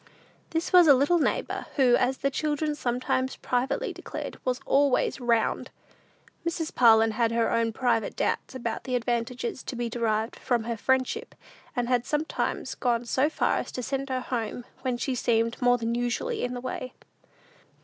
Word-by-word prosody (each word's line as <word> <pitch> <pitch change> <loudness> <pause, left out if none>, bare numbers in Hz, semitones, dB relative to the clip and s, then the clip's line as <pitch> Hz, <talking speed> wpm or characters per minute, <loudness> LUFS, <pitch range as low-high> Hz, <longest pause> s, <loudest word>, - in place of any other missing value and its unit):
This 325 +2 -2
was 355 -2 +8
a 285 - +9
little 290 +7 +3
neighbor, - - -1
who, 255 -4 +5
as 260 +2 +1
the 275 - 0
children 300 +1 -1
sometimes 260 -1 -1
privately 250 +1 -1
declared, - - -7
was 255 0 -1
"always 280 -1 +2
'round." 235 -2 +1 0.7
Mrs. 330 -1 -2
Parlin 225 -2 +6
had 230 +1 +1
her 230 0 +1
own 230 0 +1
private 230 -1 0
doubts - - -1
about 235 -3 -4
the 255 -2 -1
advantages 240 +1 -2
to - - -6
be 240 -1 -3
derived 225 -1 -1
from 245 -4 0
her 235 +1 -2
friendship, 260 +3 0 0.4
and 245 -2 0
had 245 -1 +2
sometimes 305 +2 -2
gone 240 -1 0
so 265 +5 +2
far - - +1
as - - -4
to 250 - -4
send 275 +2 -3
her 255 -1 -1
home, 240 -1 -3 0.2
when 255 -2 -1
she 265 +2 -2
seemed 230 -1 0
more 245 0 +4
than 230 0 -2
usually 240 0 -1
in 245 0 -2
the 245 - -5
way. 255 0 -5
245 Hz, 170 wpm, -27 LUFS, 235-265 Hz, 0.7 s, a